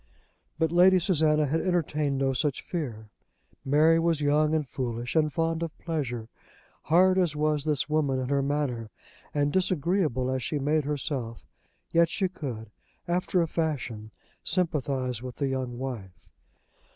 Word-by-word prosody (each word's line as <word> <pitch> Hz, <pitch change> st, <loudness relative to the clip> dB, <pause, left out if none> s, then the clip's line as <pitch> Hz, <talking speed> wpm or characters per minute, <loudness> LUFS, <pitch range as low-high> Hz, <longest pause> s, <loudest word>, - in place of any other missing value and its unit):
But 160 Hz, -1 st, +1 dB
Lady 185 Hz, +2 st, +6 dB
Susanna 155 Hz, -4 st, +2 dB
had 155 Hz, +4 st, 0 dB
entertained 155 Hz, -6 st, 0 dB
no 135 Hz, 0 st, +1 dB
such 140 Hz, 0 st, -1 dB
fear. 115 Hz, -11 st, -5 dB, 0.5 s
Mary 155 Hz, +4 st, +4 dB
was 165 Hz, -2 st, +1 dB
young, 150 Hz, +1 st, +2 dB
and 150 Hz, -3 st, -1 dB
foolish, 120 Hz, 0 st, -4 dB
and 155 Hz, -1 st, +3 dB
fond 165 Hz, +1 st, -1 dB
of 165 Hz, -1 st, -4 dB
pleasure. 125 Hz, -9 st, -3 dB, 0.6 s
Hard 185 Hz, +4 st, +4 dB
as 170 Hz, -5 st, +1 dB
was 150 Hz, -1 st, 0 dB
this 150 Hz, -3 st, 0 dB
woman 150 Hz, -3 st, +1 dB
in 130 Hz, 0 st, -2 dB
her 140 Hz, -1 st, +2 dB
manner, 135 Hz, -5 st, -1 dB, 0.4 s
and 145 Hz, 0 st, 0 dB
disagreeable 170 Hz, -, +1 dB
as 130 Hz, 0 st, -1 dB
she 150 Hz, -, -2 dB
made 145 Hz, +1 st, +1 dB
herself, 135 Hz, -, -3 dB, 0.5 s
yet 170 Hz, 0 st, +4 dB
she 190 Hz, +1 st, 0 dB
could, 120 Hz, -, -7 dB, 0.4 s
after 180 Hz, 0 st, +1 dB
a -, -, -2 dB
fashion, 135 Hz, -10 st, -3 dB, 0.3 s
sympathise 135 Hz, -, 0 dB
with 125 Hz, -1 st, -7 dB
the 140 Hz, -2 st, -1 dB
young 130 Hz, -2 st, -3 dB
wife. 120 Hz, -8 st, -7 dB
150 Hz, 150 wpm, -27 LUFS, 130-165 Hz, 0.6 s, Lady